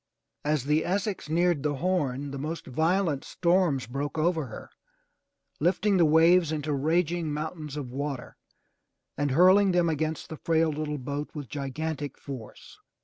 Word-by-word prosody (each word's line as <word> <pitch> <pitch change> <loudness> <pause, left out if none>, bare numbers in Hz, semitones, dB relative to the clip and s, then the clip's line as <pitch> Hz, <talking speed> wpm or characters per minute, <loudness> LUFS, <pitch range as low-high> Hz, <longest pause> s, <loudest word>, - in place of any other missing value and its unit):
As 150 -2 +1
the 150 +3 +2
Essex 195 -2 -2
neared 170 -1 +2
the 145 0 0
Horn, 145 -5 -1
the 140 - -5
most 155 +4 -4
violent 160 +2 +1
storms 170 -5 +1
broke 140 +5 -4
over 160 -2 +1
her, 110 - -10 0.9
lifting 190 +5 +2
the 170 - +5
waves 165 +2 +5
into 150 -1 -2
raging 160 +3 0
mountains 150 -1 -5
of 130 -4 -5
water 140 -1 -4 0.8
and 145 0 0
hurling 185 +6 +5
them 175 -1 +3
against 155 0 -2
the 160 - -6
frail 160 0 +2
little 150 0 -3
boat 145 +2 -4
with 145 -4 -6
gigantic 145 +1 -4
force. 130 -6 -10
155 Hz, 145 wpm, -27 LUFS, 145-170 Hz, 0.9 s, the